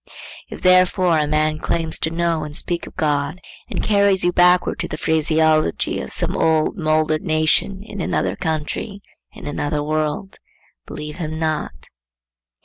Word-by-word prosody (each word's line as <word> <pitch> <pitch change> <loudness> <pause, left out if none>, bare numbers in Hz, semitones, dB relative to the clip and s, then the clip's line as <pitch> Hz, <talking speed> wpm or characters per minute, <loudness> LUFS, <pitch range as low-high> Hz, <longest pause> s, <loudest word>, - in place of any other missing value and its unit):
If - - -9
therefore 185 -2 +4
a 150 - +1
man 155 0 +1
claims 165 -1 -1
to 160 - 0
know 165 -1 0
and 150 0 -6
speak 175 -1 -3
of - - -13
God 150 +1 -1 0.3
and - - -3
carries 200 -2 +3
you 175 - +3
backward 180 0 +3
to - - -2
the 155 - -5
phraseology 155 - +1
of 65 - -7
some - - -1
old 160 -1 +2
mouldered 155 -3 +1
nation 155 +5 +1
in 210 -3 -7
another - - -1
country, 160 +5 -3 0.3
in 215 -3 -11
another 145 0 -2
world, 155 +5 -2 0.5
believe 150 +1 -7
him 155 -3 -4
not. 160 -1 -3
160 Hz, 150 wpm, -20 LUFS, 155-180 Hz, 0.5 s, therefore